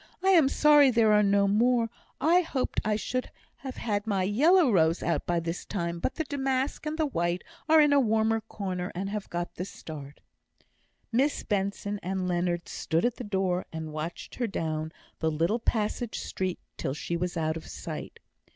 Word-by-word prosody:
I 380 - +4
am 330 -8 +6
sorry 295 -1 +6
there 225 -3 +4
are 210 - +6
no 200 0 +3
more; 230 +2 +2 0.3
I 340 +4 +4
hoped 285 -6 -2
I 215 0 +1
should 255 +4 -2 0.3
have 265 -2 -7
had 205 -2 -2
my 195 -3 +1
yellow 290 - +4
rose 165 -3 +3
out 170 - -1
by 175 -1 +1
this 165 +1 -4
time, 170 -4 -3
but 215 - -2
the 320 - -1
damask 270 0 -1
and 305 +1 -2
the 315 - +2
white 175 - -1 0.3
are 320 0 +7
in 295 -1 +5
a 285 - +6
warmer 225 -2 +2
corner, 185 -4 -4
and 195 +2 -3
have 210 -1 -4
got 175 0 -3
the 180 - -4
start." 150 -6 -9 0.9
Miss 270 +5 +1
Benson 200 0 -2
and 185 0 -2
Leonard 175 -1 -1
stood 165 +5 -1
at 245 -1 0
the - - -5
door, 190 -3 -1
and 160 -1 -6
watched 155 +3 -5
her 240 - -1
down 160 -4 -3 0.3
the 160 - +1
little 165 +9 +1
passage 225 +1 -1
street 185 -1 -3 0.2
till 135 - -2
she 170 - -3
was 175 +1 -2
out 155 -1 0
of 165 - -8
sight. - - -7
205 Hz, 190 wpm, -28 LUFS, 175-250 Hz, 0.9 s, are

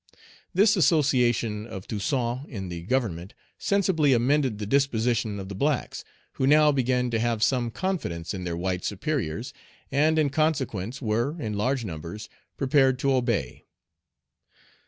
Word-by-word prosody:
This 205 +3 +4
association 125 - +2
of 95 -4 -8
Toussaint 125 +4 -2
in 95 -7 -6
the 85 -1 -5
Government 95 -4 -2 0.2
sensibly 180 -8 +2
amended 130 -1 +2
the 105 - -4
disposition 115 -4 +1
of 95 - -6
the 100 - -6
blacks, 140 +5 -1 0.3
who 130 - -1
now 150 +1 +6
began 125 -2 0
to 115 - 0
have 115 -1 0
some 125 -2 +1
confidence 115 - -3
in 95 -2 -5
their 85 -1 -3
white 90 +1 -2
superiors, 115 - -3 0.4
and 155 +3 +3
in 150 -3 +2
consequence 135 - -1
were, 120 +9 -1
in 110 -6 -3
large 125 +4 0
numbers, 85 +4 -7 0.3
prepared 135 -1 +3
to 135 +1 +1
obey. 115 - -1
125 Hz, 140 wpm, -26 LUFS, 105-140 Hz, 0.4 s, now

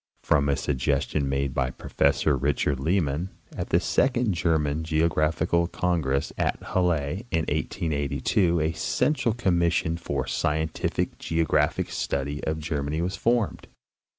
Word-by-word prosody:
From 70 -2 +2
a 70 - +3
suggestion 70 +1 0
made 70 -1 -1
by 65 -3 0
Professor 70 +3 +1
Richard 70 0 0
Lehmann 80 +1 0 0.3
at - - -4
the - - +4
second 125 -5 +1
German 80 -3 0
Geographical 80 +1 +1
Congress 80 -7 0
at - - +1 0.2
Halle 90 0 +1
in 80 - +1
1882 80 +3 0
a 80 +1 0
central 115 - 0
commission 85 -6 +1
for 70 -5 -2
the 65 - -8
scientific 80 +1 -1
geographic 80 -1 +1
study 70 +2 -2
of 80 0 -1
Ger 75 -2 -2
many 75 +3 -2
was 90 +3 -1
formed. 115 +2 0
80 Hz, 130 wpm, -26 LUFS, 70-85 Hz, 0.3 s, the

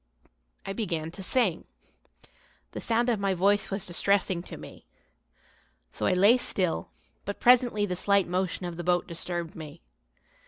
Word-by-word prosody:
I 195 - -3
began 165 -7 -3
to 195 - -8
sing. 195 -4 0 1.1
The - - -6
sound 235 +1 +1
of 235 -4 +1
my 195 -1 0
voice 200 +3 +2
was 195 -1 -1
distressing 185 0 +1
to - - -9
me. - - -13 1.0
So - - -2
I - - +3
lay 200 +7 +6
still, 185 -8 -1 0.3
but 200 - -5
presently 240 -4 +4
the 180 -3 -3
slight 200 +1 +2
motion 185 0 -2
of 175 -1 -6
the 175 - -5
boat 175 0 +1
disturbed 170 -1 -4
me. 155 - -10
190 Hz, 155 wpm, -27 LUFS, 175-205 Hz, 1.1 s, lay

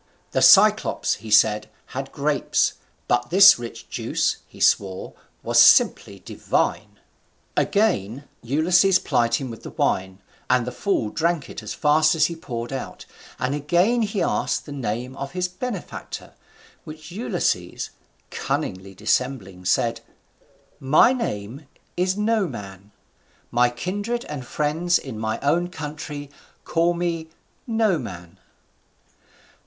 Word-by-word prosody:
The - - 0
Cyclops, - - +5
he 110 - -9
said, 105 0 +4 0.2
had - - -5
grapes, - - 0 0.3
but 120 0 +1
this 195 -1 +8
rich 120 -1 -8
juice, - - -1
he - - -16
swore, 95 -2 +1 0.3
was - - +4
simply - - +5
divine. - - -2 0.6
Again 140 - +1 0.2
Ulysses 175 +9 +3
plied 115 -7 +1
him 130 -3 -4
with 115 - -10
the - - -8
wine, 95 0 -1 0.3
and 125 -2 +3
the 125 - -4
fool 125 - -1
drank 170 -2 -1
it - - -7
as - - -6
fast 155 +2 +3
as 160 - +4
he 170 - -3
poured 120 -5 -6
out, 135 - -6 0.3
and 125 +2 -1
again 175 - +2
he 210 -2 -1
asked - - -1
the 145 - -9
name 125 -1 -4
of 140 +3 -6
his 180 0 -1
benefactor, 195 +2 -7 0.5
which 155 +1 -11
Ulysses, 180 - -2 0.4
cunningly 95 +1 -4
dissembling, 105 -4 -2
said, 115 +5 +1 0.8
"My 150 - +5
name 135 - -5 0.3
is 185 +2 0
Noman: 120 - -2 0.6
my 120 +1 +3
kindred 205 - -4
and 140 -5 -7
friends 160 +5 +1
in 125 -6 -7
my 110 0 -2
own 170 +5 +1
country 150 -3 -7 0.3
call 170 +1 +1
me 170 -2 -3 0.4
Noman." 150 - -2
145 Hz, 125 wpm, -23 LUFS, 115-175 Hz, 0.8 s, this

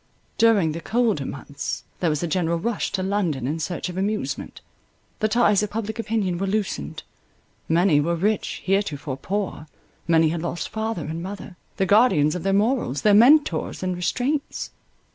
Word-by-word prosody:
During 215 -8 +4
the 165 +2 -5
colder 220 - 0
months 140 0 -5 0.2
there 175 - +1
was 150 +1 -1
a - - 0
general 170 0 0
rush 225 +5 -2
to 190 - -1
London 185 -10 -1
in 150 +5 -2
search 175 +4 -3
of 180 0 -6
amusement—the 210 +1 -5
ties 210 -3 +3
of 210 - -2
public 220 +1 -4
opinion 210 -6 -1
were 195 - -1
loosened; 190 - -2 0.7
many 165 -2 +4
were 170 +3 0
rich, 205 +5 -1
heretofore 155 -9 -1
poor—many 165 -2 -1
had 165 0 -2
lost 170 0 -3
father 220 -7 -3
and 160 +2 -4
mother, 190 0 -7 0.2
the 190 - +2
guardians 190 -8 +4
of 180 - -4
their 195 - 0
morals, 205 - +1
their 210 - +5
mentors 235 - +4
and 185 -1 -1
restraints. 255 - -2
190 Hz, 160 wpm, -23 LUFS, 160-215 Hz, 0.7 s, their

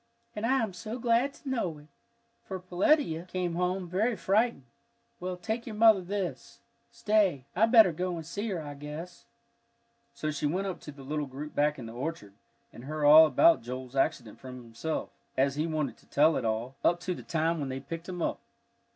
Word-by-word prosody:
"And 210 +2 -1
I 265 -1 +3
am 210 -4 -3
so 215 +6 -6
glad 240 +3 +2
to - - -14
know 225 - -1
it, 150 - -15 0.6
for 190 -1 -6
Peletiah 180 - +1
came 180 -2 -2
home 180 +1 -1
very 210 +7 0
frightened. 215 - +1 0.6
Well, 180 0 -4
take 220 +6 -4
your 220 - -5
mother 220 -2 +6
this. 190 0 -5 0.3
Stay, 210 - +1
I 220 +5 +4
better 225 -5 +7
go 180 +2 -2
and 165 -2 -6
see 205 +7 -4
her, 185 -4 -2
I 145 -2 -7
guess." 150 +7 -8 0.9
So 155 -8 -2
she 150 0 -1
went 185 +6 -1
up 190 -2 -4
to 150 - -9
the 140 -1 -13
little 150 +1 -3
group 145 +3 -7
back 150 +1 +1
in 125 - -7
the 115 - -8
orchard, 125 -5 -5 0.4
and 120 - -11
heard 150 +1 -2
all 155 +2 +9
about 160 +3 +5
Joel's 125 +2 -7
accident 125 -6 -1
from 125 0 -9
himself, 115 +8 -4 0.3
as 135 +1 +3
he 150 +3 -1
wanted 155 -4 -2
to - - -24
tell 155 +3 +4
it 125 - -2
all, 115 +3 -2
up 175 0 +3
to 180 0 -2
the - - -8
time 165 0 0
when 140 -2 -3
they 130 0 -4
picked 165 +5 -7
him 175 -2 -3
up. - - -1
165 Hz, 205 wpm, -29 LUFS, 145-195 Hz, 0.9 s, all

